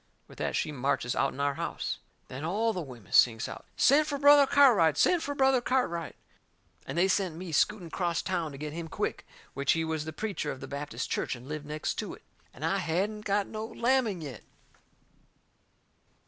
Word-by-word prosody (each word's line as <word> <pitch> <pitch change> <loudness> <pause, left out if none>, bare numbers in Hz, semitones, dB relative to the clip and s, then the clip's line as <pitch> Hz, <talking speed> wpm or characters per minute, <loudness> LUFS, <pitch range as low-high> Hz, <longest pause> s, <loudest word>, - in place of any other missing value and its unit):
With - - -15
that - - -1
she - - -1
marches 135 -3 -1
out'n 135 0 0
our 140 0 +1
house. - - -4 0.3
Then 130 +3 -7
all 215 +7 0
the 180 - -3
women 120 - -11
sings 115 -2 +4
out: - - -9
"Send 300 +3 +5
fur 285 - -2
Brother 285 0 +7
Cartwright! 215 - +5
Send 355 -2 +4
fur 285 -2 -3
Brother 265 -2 +3
Cartwright!" 240 - -1 0.7
And 135 - -4
they 180 +2 +4
sent 190 -4 0
me 175 0 -7
scooting 180 +3 +1
acrost 170 -1 -1
town 170 -4 -1
to 140 - -9
get 150 +1 -5
him 165 0 -5
quick. - - -3 0.3
Which 140 +1 +2
he 165 0 -1
was 160 -1 -2
the 160 - -4
preacher 190 -3 -3
of 130 - -7
the - - -8
Baptist 145 +1 -5
church - - -1
and 125 +2 -12
lived 150 0 -6
next 150 0 -3
to - - -4
it. - - -21 0.3
And 150 - -6
I 170 +4 +1
hadn't 195 +5 -1
got 200 0 +1
no 215 0 -6
lamming 235 -4 0
yet! 140 -7 -7
170 Hz, 195 wpm, -29 LUFS, 145-220 Hz, 0.7 s, Brother